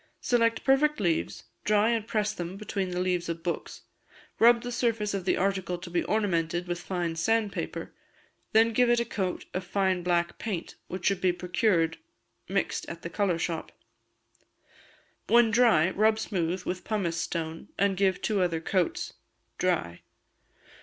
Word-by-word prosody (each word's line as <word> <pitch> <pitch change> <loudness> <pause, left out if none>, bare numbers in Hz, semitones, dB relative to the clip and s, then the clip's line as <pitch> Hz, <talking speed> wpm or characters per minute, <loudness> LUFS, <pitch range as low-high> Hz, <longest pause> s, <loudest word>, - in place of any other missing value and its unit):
Select 230 -2 +2
perfect 295 +2 +3
leaves, 170 -5 -1 0.2
dry 210 +1 +3
and 225 -2 -1
press 215 -2 0
them 175 +2 -5
between 200 -2 -3
the 180 0 -3
leaves 180 -2 0
of 165 0 -4
books; 170 -1 -4 0.6
rub 235 +1 +6
the 245 - -4
surface 230 -4 0
of 195 -2 -3
the - - +2
article 190 -2 0
to 175 0 -9
be 175 - +1
ornamented 175 -5 0
with 175 0 -3
fine 175 -3 -2
sand 215 +5 +1
paper, - - -5 0.6
then 225 +1 +4
give 245 +2 +4
it 240 0 +4
a 235 - 0
coat 190 -5 -3
of 185 - -2
fine 190 0 0
black 175 -1 0
paint, 195 -7 -4
which 185 0 -6
should 195 -2 +2
be 185 - +4
procured 175 -1 +1 0.5
mixed - - -1
at - - -8
a - - -2
colour 195 -5 +1
shop. 165 -1 -3 1.6
When 235 -1 +5
dry 230 -8 +4
rub 215 +2 +3
smooth 180 -4 -2
with 180 0 -4
pumice 190 -6 -1
stone, 165 -1 -4
and 200 0 +2
give 190 -1 +1
two 210 -3 +1
other 170 -3 +1
coats. 175 +1 -1 0.5
Dry. 85 +1 0
190 Hz, 160 wpm, -28 LUFS, 175-220 Hz, 1.6 s, rub